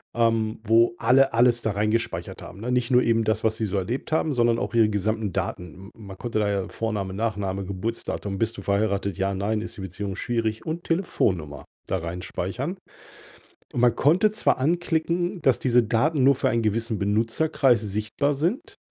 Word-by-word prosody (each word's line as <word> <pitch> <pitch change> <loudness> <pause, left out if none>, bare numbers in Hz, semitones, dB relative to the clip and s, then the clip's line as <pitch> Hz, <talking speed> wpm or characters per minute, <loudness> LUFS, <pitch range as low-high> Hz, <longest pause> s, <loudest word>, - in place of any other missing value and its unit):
ähm, 115 -1 +1
wo 115 +1 +4
alle 130 +3 +4
alles 120 0 +4
da 110 - -1
reingespeichert 105 +3 -2
haben, 90 - -10
ne? 125 +2 -3
Nicht 125 0 0
nur 125 0 +6
eben 115 -1 +2
das, 110 0 0
was 110 0 +1
sie 110 - -1
so 100 -1 -2
erlebt 115 - -3
haben, 155 -1 +1
sondern 120 -2 +2
auch - - -3
ihre 115 -2 +4
gesamten 105 0 -1
Daten. 90 - -3
M 95 +3 -13
m 110 - -13
man 95 -1 -9
konnte 115 0 -2
da 105 -1 +1
ja 100 -2 -1
Vorname, 105 -4 -3
Nachname, 100 -2 -2
Geburtsdatum, 100 0 -4
bist 115 +2 -1
du - - -6
verheiratet? 100 -1 0
Ja, 100 0 0
nein? 105 +3 -1
ist 115 - -7
die - - -7
Beziehung 95 +1 -5
schwierig, 110 -1 -2
und 165 +2 -4
Telefonnummer 95 - -1 0.2
da 95 - 0
reinspeichern. 90 - -4 1.0
Und - - -2
man 120 -1 +4
konnte 175 - +3
zwar 215 - +1
anklicken, 170 +3 0
dass 135 -4 +3
diese 125 -2 +3
Daten 130 +6 +1
nur 140 +1 +6
für 130 0 0
einen 115 -1 +1
gewissen 115 0 -1
Benutzerkreis 115 +5 +2
sichtbar 110 +8 -1
sind, 175 - -2
115 Hz, 185 wpm, -25 LUFS, 100-125 Hz, 1.0 s, nur